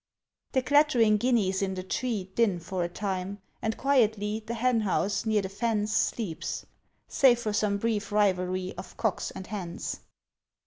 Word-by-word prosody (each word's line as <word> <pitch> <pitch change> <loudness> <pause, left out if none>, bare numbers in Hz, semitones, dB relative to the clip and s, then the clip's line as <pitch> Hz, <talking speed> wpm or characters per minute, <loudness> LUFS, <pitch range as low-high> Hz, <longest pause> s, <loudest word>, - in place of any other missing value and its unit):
The 260 -2 +2
clattering 255 -6 +4
guineas 205 -5 +1
in 190 -1 -1
the 185 - -4
tree 200 -1 -2
Din 205 -6 +2
for 180 +2 -3
a 170 - -2
time; 190 +1 -3 0.2
and 220 0 -1
quietly 220 -5 +1
The 235 +2 -4
henhouse, 220 -4 +1
near 215 -2 +2
the 190 - -4
fence, 210 +1 -1
Sleeps, 215 -6 -1 0.4
save 255 -3 +5
for 220 -3 -2
some 205 -1 +1
brief 210 -1 -1
rivalry 185 -2 +1
Of 185 0 -10
cocks 220 -5 -1
and 190 - -8
hens. 185 -5 -5
210 Hz, 150 wpm, -28 LUFS, 190-230 Hz, 0.4 s, save